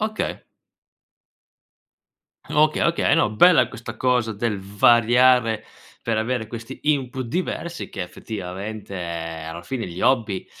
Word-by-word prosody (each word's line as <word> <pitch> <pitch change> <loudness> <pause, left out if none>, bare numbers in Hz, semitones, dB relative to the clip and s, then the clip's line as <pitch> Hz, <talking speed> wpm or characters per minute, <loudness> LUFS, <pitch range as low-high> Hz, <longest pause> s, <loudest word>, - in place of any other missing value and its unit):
Okay. 215 0 -3 2.1
Okay, 155 0 +3
okay, 170 -4 +2
no 165 -10 +2
bella 165 +11 +5
questa 115 0 -8
cosa 125 -3 +1
del 105 -1 -1
variare 120 +2 +4 0.4
per 115 -2 0
avere 110 0 -1
questi 115 +3 -8
input 135 -3 0
diversi 170 +3 -3
che 95 - -5
effettivamente, 100 +2 -7
ehm, 85 -2 -5
alla 85 +1 -7
fine 120 +4 -4
gli 90 +1 -7
hobby 110 -7 +1
115 Hz, 120 wpm, -23 LUFS, 100-130 Hz, 2.1 s, bella